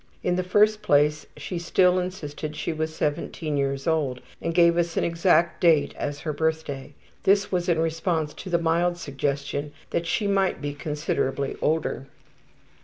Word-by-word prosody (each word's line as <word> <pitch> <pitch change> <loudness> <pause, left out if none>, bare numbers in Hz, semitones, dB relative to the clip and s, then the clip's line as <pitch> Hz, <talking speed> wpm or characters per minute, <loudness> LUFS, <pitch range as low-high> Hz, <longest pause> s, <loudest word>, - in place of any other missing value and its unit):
In 180 - +1
the 185 - +1
first 210 +4 +3
place 150 -5 +2
she 180 - -4
still 180 +2 +3
insisted 155 -4 -5
she 160 - -2
was 155 0 -3
17 150 +1 -2
years 140 -1 -1
old 150 -6 0 0.2
and 165 - -1
gave 170 0 +5
us 170 -1 0
an - - +2
exact 170 0 +2
date 165 -4 +4
as 145 0 -4
her 155 - -3
birthday 145 -3 -2 0.3
this 200 +1 +3
was 180 -1 0
in 170 - +3
response 160 -1 -1
to - - -8
the 175 - +3
mild 170 +1 +1
suggestion 140 -1 -3 0.2
that 170 - -1
she 210 +5 0
might 195 -1 +1
be 145 0 -3
considerably 145 -3 -2
older. 155 -3 0
160 Hz, 165 wpm, -25 LUFS, 145-175 Hz, 0.3 s, gave